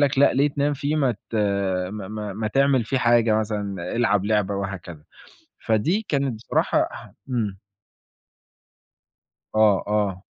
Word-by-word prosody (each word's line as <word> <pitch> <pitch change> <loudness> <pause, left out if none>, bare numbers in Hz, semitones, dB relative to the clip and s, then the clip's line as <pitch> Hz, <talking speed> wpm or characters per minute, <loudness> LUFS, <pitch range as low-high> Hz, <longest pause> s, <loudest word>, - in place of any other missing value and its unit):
لك 140 -2 +2
لأ 140 - +6
ليه 140 +2 +3
تنام 145 +1 0
فيه 145 +3 -1
ما 135 -5 +2
ت 105 +2 -13 0.6
ما 105 -3 -6
ما 105 -1 -5
ما 110 +2 -3
تعمل 135 -1 +2
فيه 130 +4 -1
حاجة 120 -2 +3
مثلًا، 105 -3 -3
العب 105 -4 +2
لعبة 105 -2 +1
وهكذا. 95 -5 -6 0.6
فدي 160 - +1
كانت 140 -3 0
بصراحة 110 - 0
ح - - -10 0.2
إمم. 105 -6 -2 2.0
آه، 105 -3 +4
آه. 100 -2 -1
110 Hz, 140 wpm, -23 LUFS, 100-135 Hz, 2.0 s, لأ